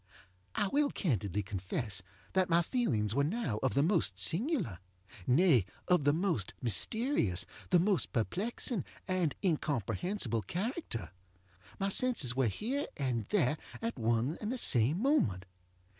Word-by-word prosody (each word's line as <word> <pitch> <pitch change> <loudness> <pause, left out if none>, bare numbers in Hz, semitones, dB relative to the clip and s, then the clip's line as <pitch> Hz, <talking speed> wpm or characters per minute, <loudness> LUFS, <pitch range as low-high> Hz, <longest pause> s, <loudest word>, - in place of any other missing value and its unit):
I 205 - +1
will 285 +7 +2
candidly 105 - -1
confess 95 +1 -3 0.3
that 185 -1 +2
my 170 0 +4
feelings 115 - 0
were 140 +3 +2
now 150 - -1
of 135 -2 0
the 140 - +4
most 160 - +2
singularŌĆönay, 125 - +1 0.2
of 180 -6 +3
the 145 - +6
most 165 - -1
mysterious, 120 - +1 0.2
the 180 - +5
most 190 +1 +2
perplexing 195 - -1 0.2
and 180 -6 0
incomprehensible 145 - 0
character. 170 - -4 0.7
My 195 0 0
senses 195 - +1
were 130 -2 +2
here 250 - -2
and 125 -6 -1
there 155 -6 +2 0.2
at 230 - -4
one 115 +6 0
and 215 +1 -2
the 255 - -2
same 130 - +4
moment. 160 - +1
145 Hz, 130 wpm, -32 LUFS, -, 0.7 s, the